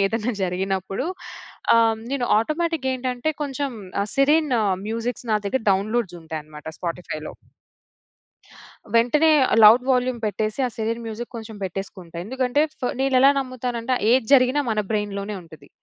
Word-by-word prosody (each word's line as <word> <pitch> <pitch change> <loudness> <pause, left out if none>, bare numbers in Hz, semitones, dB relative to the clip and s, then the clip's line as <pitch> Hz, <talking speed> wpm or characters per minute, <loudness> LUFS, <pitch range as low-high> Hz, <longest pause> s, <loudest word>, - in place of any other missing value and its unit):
ఏదన్నా 225 +3 -1
జరిగినప్పుడు 190 - -2 0.7
ఆహ్, 225 -1 +4
నేను 275 -3 -1
ఆటోమేటిక్ 315 +3 -1
గేంటంటే 255 +3 -1
కొంచెం 280 -1 -2 0.3
ఆహ్, 205 - -4
సిరిన్ 295 +1 +3 0.3
మ్యూజిక్స్ 230 +3 -3
నా - - +4
దగ్గర 265 +6 0
డౌన్‌లోడ్స్ 200 -1 0
ఉంటాయనమాట 155 -1 -8
స్పాటిఫై‌లో. 165 -3 -5 1.6
వెంటనే 295 +8 +4 0.3
లౌడ్ 235 +4 +8
వాల్యూమ్ 250 -1 0
పెట్టేసి, 215 +2 -2
ఆ - - -2
సిరిన్ 230 +1 -2
మ్యూజిక్ 225 +3 -6
కొంచెం 220 -1 -8
బెట్టేసుకుంటా. 185 -2 -6
ఎందుకంటే, 260 +4 0 0.2
ఫ - - -31 0.2
నేనెలా 270 0 +5
నమ్ముతానంటే 255 -1 -3 0.2
ఏది 250 -2 +3
జరిగినా 255 +2 +4
మన 215 - -1
బ్రైన్‌లోనే 205 -1 -2
ఉంటది. 155 -4 -15
230 Hz, 125 wpm, -23 LUFS, 200-260 Hz, 1.6 s, లౌడ్